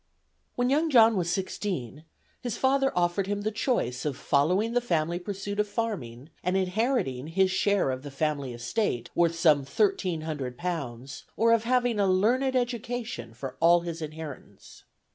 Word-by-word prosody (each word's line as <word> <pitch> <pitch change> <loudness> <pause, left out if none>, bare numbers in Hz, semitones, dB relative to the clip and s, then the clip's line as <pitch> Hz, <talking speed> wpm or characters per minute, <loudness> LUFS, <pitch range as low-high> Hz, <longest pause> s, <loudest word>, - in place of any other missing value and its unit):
'" - - -46
When 245 +1 +1
young 310 +3 +2
John 230 -5 +6
was 175 -3 0
sixteen, 170 - -3 0.4
his 240 -3 -3
father 270 +1 +2
offered 175 +2 +1
him 205 0 -2
the 215 +1 -1
choice 205 - -1
of 145 -3 -2
following 180 +14 +1
the 245 - +2
family 170 -6 0
pursuit 200 +2 -5
of 210 - +2
farming, 165 - -4
and 180 +2 +1
inheriting 185 - 0
his 190 +3 +2
share 200 -6 +2
of 130 0 -4
the 145 - -8
family 140 -1 -2
estate, 120 - -2
worth 170 -1 +2
some 155 -4 +4
thirteen 185 +2 0
hundred 145 -6 -4
pounds, 140 -8 -5
or 230 0 +4
of 230 0 +2
having 245 -2 +2
a 200 - +3
"learned 240 +8 +2
education" 235 - -3
for 130 +1 -7
all 170 +1 +5
his 170 -1 -5
inheritance. 155 0 -9
180 Hz, 165 wpm, -27 LUFS, 145-225 Hz, 0.4 s, John